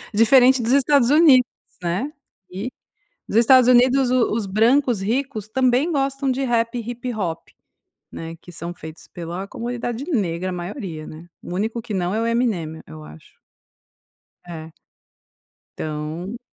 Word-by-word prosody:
diferente 250 Hz, +3 st, +5 dB
dos 235 Hz, -, 0 dB
Estados 280 Hz, -2 st, +4 dB
Unidos, 290 Hz, -5 st, +6 dB, 0.4 s
né, 185 Hz, +12 st, -2 dB, 0.4 s
e, 200 Hz, +8 st, -5 dB, 0.6 s
nos 220 Hz, -, +1 dB
Estados 250 Hz, +1 st, +6 dB
Unidos 255 Hz, +1 st, +4 dB
o 255 Hz, -2 st, +2 dB
os 225 Hz, -1 st, -1 dB
brancos 235 Hz, +3 st, +2 dB
ricos 230 Hz, 0 st, -2 dB
também 255 Hz, +6 st, +2 dB
gostam 275 Hz, -1 st, 0 dB
de 260 Hz, +1 st, -1 dB
rap 235 Hz, -1 st, 0 dB
e -, -, -4 dB
hip-hop, 230 Hz, -8 st, -5 dB, 0.6 s
né, 165 Hz, 0 st, -7 dB
que 175 Hz, -, -14 dB
são 170 Hz, +1 st, -6 dB
feitos 160 Hz, -2 st, -11 dB
pela 175 Hz, +3 st, -6 dB
comunidade 240 Hz, +2 st, -4 dB
negra 185 Hz, -, -1 dB
a -, -, -3 dB
maioria, 175 Hz, -, -6 dB
né, 160 Hz, +2 st, -11 dB
o 175 Hz, -, -7 dB
único 220 Hz, +4 st, -2 dB
que 220 Hz, -, -7 dB
não 180 Hz, +1 st, -1 dB
é 220 Hz, -, 0 dB
o 230 Hz, -, 0 dB
Eminem 205 Hz, -10 st, -1 dB
eu 80 Hz, 0 st, -11 dB
acho. 75 Hz, +1 st, -15 dB, 1.1 s
É. 160 Hz, -2 st, -8 dB, 1.1 s
Então 155 Hz, +8 st, -5 dB
230 Hz, 145 wpm, -21 LUFS, 175-255 Hz, 1.1 s, Unidos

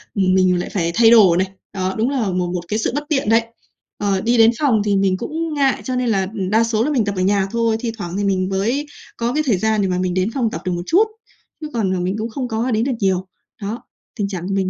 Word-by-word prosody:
ừm, 190 Hz, -2 st, +2 dB
mình 185 Hz, -1 st, +3 dB
lại -, -, -4 dB
phải 170 Hz, -4 st, -1 dB
thay 230 Hz, 0 st, +6 dB
đồ 205 Hz, -7 st, +7 dB
này, 190 Hz, +1 st, +1 dB, 0.3 s
đó, 190 Hz, -1 st, -2 dB
đúng 225 Hz, +4 st, +1 dB
là 255 Hz, -7 st, -1 dB
một 180 Hz, -1 st, -1 dB
một 180 Hz, -, -2 dB
cái 215 Hz, +5 st, -1 dB
sự -, -, 0 dB
bất 295 Hz, -, -1 dB
tiện, 270 Hz, -8 st, 0 dB
đấy. 225 Hz, +1 st, +5 dB, 0.6 s
Ờ, 200 Hz, -2 st, 0 dB
đi 235 Hz, +3 st, +1 dB
đến 225 Hz, 0 st, +6 dB
phòng 255 Hz, -8 st, +3 dB
thì 205 Hz, -1 st, +2 dB
mình 195 Hz, -1 st, +2 dB
cũng 320 Hz, -, -4 dB
ngại 275 Hz, -2 st, +1 dB
cho 255 Hz, -, -3 dB
nên 250 Hz, -1 st, 0 dB
là, 195 Hz, -3 st, +1 dB
ừ, 220 Hz, -, -6 dB
đa 220 Hz, +2 st, +4 dB
số 230 Hz, -1 st, +1 dB
là 295 Hz, -, 0 dB
mình 245 Hz, -7 st, +1 dB
tập 200 Hz, -1 st, -2 dB
ở -, -, 0 dB
nhà 195 Hz, +1 st, +2 dB
thôi, 230 Hz, -1 st, +1 dB
thi 230 Hz, 0 st, -3 dB
thoảng 175 Hz, -3 st, -5 dB
thì 205 Hz, -, -1 dB
mình 190 Hz, -2 st, 0 dB
mới 225 Hz, +10 st, -1 dB, 0.3 s
có 235 Hz, +1 st, -1 dB
cái 305 Hz, +2 st, +1 dB
thời 230 Hz, -8 st, +2 dB
gian 220 Hz, +2 st, +1 dB
để 195 Hz, -, +1 dB
mà 180 Hz, -1 st, -1 dB
mình 180 Hz, -1 st, -1 dB
đến 185 Hz, +3 st, 0 dB
phòng 245 Hz, -4 st, 0 dB
tập -, -, -5 dB
được 185 Hz, -, -1 dB
một 175 Hz, 0 st, -3 dB
chút, 365 Hz, -, +4 dB, 0.6 s
chứ 305 Hz, -, -4 dB
còn, 200 Hz, -5 st, 0 dB
à, -, -, -2 dB
mình 180 Hz, +2 st, -1 dB
cũng 220 Hz, +1 st, -3 dB
không 250 Hz, +2 st, -4 dB
có 235 Hz, +2 st, -1 dB
đến 220 Hz, 0 st, +1 dB
được 270 Hz, -, 0 dB
nhiều. 190 Hz, -2 st, 0 dB, 0.3 s
Đó, 210 Hz, +4 st, -5 dB, 0.3 s
tình 205 Hz, -3 st, -1 dB
trạng 185 Hz, -3 st, -5 dB
của 195 Hz, -, -2 dB
mình 190 Hz, -1 st, 0 dB
210 Hz, 285 wpm, -19 LUFS, 190-235 Hz, 0.6 s, đồ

